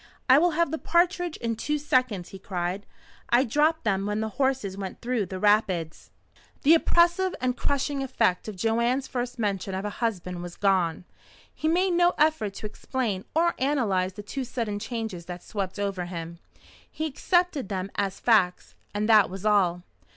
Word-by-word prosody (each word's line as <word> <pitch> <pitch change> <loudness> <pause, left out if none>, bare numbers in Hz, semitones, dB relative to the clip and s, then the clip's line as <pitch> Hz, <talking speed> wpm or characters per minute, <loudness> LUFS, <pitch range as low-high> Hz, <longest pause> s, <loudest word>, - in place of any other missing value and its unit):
"I 260 +2 +7
will 335 -1 +2
have 335 -3 +2
the 320 - -2
partridges 350 0 +1
in 230 -1 0
two 300 +7 -1
seconds!" 255 -10 0
he 195 - -10
cried. 185 +1 -3 0.4
"I 240 +2 +5
dropped 300 +6 +1
them 195 -2 0
when 210 +1 -1
the 220 0 -2
horses 265 -6 -1
went 195 -1 -6
through 235 -5 -1
the 190 - -5
rapids." 190 -6 +1 0.5
The 305 +3 +7
oppressive 345 +3 +3
and 250 0 0
crushing 280 +1 -1
effect 245 -9 0
of 215 - -5
Joanne's 235 +6 +1
first 245 0 -4
mention 195 -3 -2
of 190 +2 -3
a 210 - -2
husband 180 -6 -3
was 175 -1 -7
gone. 180 -4 +1 0.5
He 315 - -3
made 360 +3 +2
no 350 0 +3
effort 300 -10 +1
to - - -7
explain 215 -2 -3
or 340 +1 +3
analyze 215 -10 +1
the 205 +2 -8
two 265 +6 -4
sudden 230 -4 -3
changes 220 -6 -5
that 180 -1 -7
swept 195 -3 -4
over 195 -3 -2
him. 170 -1 -7 0.5
He 315 - -4
accepted 315 - 0
them 195 -1 -3
as 195 -2 -2
facts, 200 -7 +2 0.2
and 210 +1 0
that 215 -3 +6
was 190 +2 -7
all. 180 -5 +2
220 Hz, 175 wpm, -26 LUFS, 190-275 Hz, 0.5 s, I